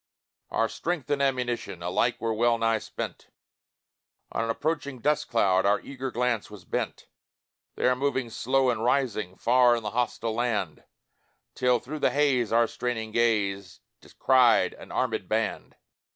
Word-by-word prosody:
Our 115 - +1
strength 155 0 -4
and 140 -1 +1
ammunition 125 -9 -1
Alike 120 +7 0
were 115 -1 -1
well 120 +1 +2
nigh 115 -1 +1
spent - - -7 1.0
On 115 - -1
an 115 - -3
approaching 140 +2 -2
dust 150 +5 0
cloud 95 -5 +3
Our 100 +1 +3
eager 135 -1 -6
glance 120 -2 -1
was 105 -3 -12
bent, - - -3 0.7
There 125 - +2
moving 130 -3 -1
slow 130 +2 +1
and 115 -2 -3
rising, 115 -7 0
Far 120 +2 +4
in 115 - -4
the 105 - -3
hostile 115 -1 -1
land, 110 -8 -2 0.7
Till, 125 -1 +2
through 140 +6 -7
the - - +3
haze, 135 -6 +1
our 115 +1 +4
straining 115 -2 -4
gaze 100 -5 0 0.2
Descried 125 -3 +3
an - - -13
armèd 110 -7 -1
band. 110 0 -2
120 Hz, 150 wpm, -27 LUFS, 110-130 Hz, 1.0 s, Far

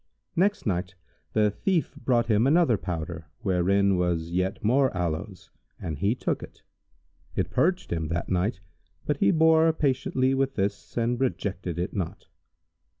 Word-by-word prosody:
Next 200 +4 +1
night 95 -2 -2 0.4
the 105 -1 +3
thief 180 - 0
brought 125 -5 +1
him 110 +2 +3
another 155 -4 +4
powder, 85 -4 -5
wherein 100 0 +2
was 85 -2 0
yet 95 +5 -1
more 130 +5 +3
aloes, 90 +2 -4 0.3
and 80 -4 -5
he 100 +6 +2
took - - -2
it: - - -12 0.7
it - - -1
purged 180 - +1
him 80 -2 -2
that 85 +3 -2
night, 95 +1 0 0.4
but 150 - 0
he - - +3
bore 160 -1 +5
patiently 130 -3 +1
with 135 0 0
this 100 +3 -3
and 120 +1 +1
rejected 95 -9 -2
it 90 +1 -2
not. 95 +1 -4
100 Hz, 150 wpm, -26 LUFS, 90-135 Hz, 0.7 s, bore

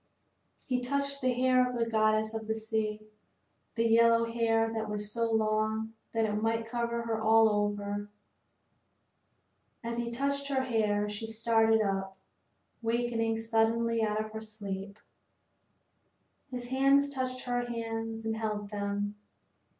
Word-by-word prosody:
He 250 -1 0
touched 280 +2 -2
the 255 0 +2
hair 255 0 +3
of 250 - -4
the 230 - +1
goddess 215 -1 +2
of 220 -1 -5
the 220 - 0
sea, 220 -1 -2 0.7
the 230 0 +2
yellow 230 0 +5
hair 225 -1 +1
that 220 -1 -3
was 210 0 -3
so 230 +1 0
long 220 0 0 0.2
that 225 -1 +1
it 210 - -1
might 225 0 0
cover 235 0 -2
her 225 -1 -2
all 225 0 +6
over. 205 -1 -1 1.7
As 235 0 -3
he 235 0 -2
touched 280 +3 -1
her 265 -2 0
hair 210 -4 +1
she 210 +2 -5
started 225 0 +3
up, 195 -1 -2 0.6
wakening 230 -1 0
suddenly 225 +1 +1
out 215 -1 +1
of 215 0 -4
her 220 0 -6
sleep. 200 -2 -6 1.5
His 245 -1 -6
hands 275 +2 +4
touched 255 -1 -3
her 245 -1 -1
hands 225 -1 -4
and 220 0 -1
held 210 -2 -3
them. 205 0 -2
225 Hz, 140 wpm, -30 LUFS, 215-235 Hz, 1.7 s, all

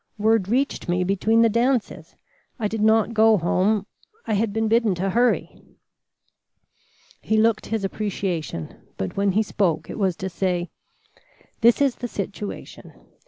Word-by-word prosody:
Word 215 -2 +2
reached 260 -4 -1
me 180 +1 +1
between 215 +5 +2
the - - +5
dances. 235 +2 -1 0.4
I 220 -5 -1
did 215 +1 -4
not 220 +1 +3
go 220 -1 +5
home. 195 +4 +1 0.4
I 220 - -1
had 210 +1 +1
been 220 +1 0
bidden 225 -3 +2
to 190 +2 -1
hurry." 240 +5 0 1.6
He 220 - 0
looked 220 0 +2
his 220 -2 -2
appreciation, 190 - -4 0.2
but 95 - -4
when 200 -1 +1
he 215 +3 +2
spoke 185 -6 -1
it - - -7
was 190 -3 +1
to 190 - -5
say: 180 -1 -2 0.9
"This 235 +3 +4
is 270 -3 +1
the 245 - -4
situation. 205 -1 -7
210 Hz, 150 wpm, -23 LUFS, 190-225 Hz, 1.6 s, the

